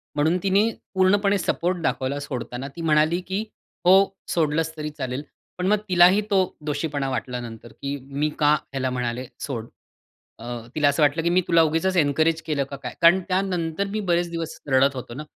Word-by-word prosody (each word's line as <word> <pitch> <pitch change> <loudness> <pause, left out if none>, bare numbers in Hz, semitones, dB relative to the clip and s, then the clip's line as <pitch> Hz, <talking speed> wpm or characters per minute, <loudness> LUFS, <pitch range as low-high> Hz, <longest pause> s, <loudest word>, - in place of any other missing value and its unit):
म्हणून 155 +4 +2
तिने 200 +3 +3 0.2
पूर्णपणे 200 +2 +3
सपोर्ट 180 0 -1
दाखवला 140 -3 -1
सोडताना 130 -1 -5
ती 170 - -7
म्हणाली 155 +1 +3
की 195 +3 -1 0.4
हो 180 - +7 0.3
सोडलंस 160 0 0
तरी 150 0 -3
चालेल. 130 +2 -3 0.3
पण 180 0 -1
मग 210 +2 +4
तिलाही 180 +3 +6
तो 195 - +4 0.3
दोषीपणा 145 -2 -2
वाटला 125 -1 -3
नंतर 115 0 -9
की 140 +1 -2
मी 140 +3 -2
का 150 -1 +5
ह्याला 135 -3 -2
म्हणाले 125 0 -3
सोड. 115 -6 -4 0.7
अ, 115 - -10 0.3
तिला 150 -2 +4
असं 145 +2 +2
वाटलं 150 +3 +2
की 170 - +2
मी 180 +1 +3
तुला 165 -1 +5
उगीचच 165 +4 +1
एन्करेज 160 +1 +2
केलं 150 -3 -1
का 140 - -8
काय? - - -5
कारण 170 +2 +7
त्यानंतर 185 -1 -1
मी 215 - -2
बरेच 175 0 +2
दिवस 165 -1 -5
रडत 135 +1 +4
होतो 125 -2 -7
ना, 145 +5 -6
155 Hz, 180 wpm, -24 LUFS, 140-175 Hz, 0.7 s, हो